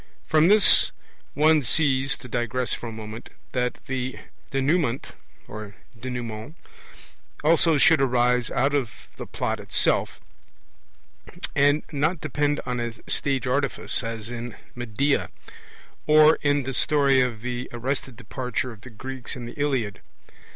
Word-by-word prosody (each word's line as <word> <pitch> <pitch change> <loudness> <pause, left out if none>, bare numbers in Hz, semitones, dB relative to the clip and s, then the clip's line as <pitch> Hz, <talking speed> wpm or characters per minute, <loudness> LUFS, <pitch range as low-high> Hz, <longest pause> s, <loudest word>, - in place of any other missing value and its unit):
From 155 +1 +4
this 210 +1 +6 0.4
one 155 +1 +4
sees 135 +1 +2
(to 125 - -11
digress 120 +1 -2
for 120 - -5
a - - -7
moment) 110 +1 -8 0.2
that 125 -1 -1
the 130 -1 -3 0.3
Denouement 135 -1 0 2.3
also 165 0 +4
should 165 -1 +5
arise 125 -2 +2
out 135 +3 +1
of 135 -5 0 0.3
the - - -7
plot - - -3
itself, - - 0 1.4
arid 145 +2 +3
not 155 +4 0
depend 145 0 -1
on 125 -1 -2
a 120 -1 -3
stage 135 -1 +1
artifice, 140 +2 +1
as 115 -1 -5
in 120 -1 -6 0.2
Medea, 125 +4 0 0.8
or 155 +1 +6
in 145 -1 +2
the 135 +1 -4
story 140 -1 +3
of 120 -3 -2
the 125 0 -4
(arrested) 130 +1 -3
departure 125 +1 -4
of 110 -3 -13
the 130 - -11
Greeks 130 +4 -7
in 125 -2 -7
the 120 - -8
Iliad. 130 -9 -2
130 Hz, 130 wpm, -24 LUFS, 120-145 Hz, 2.3 s, this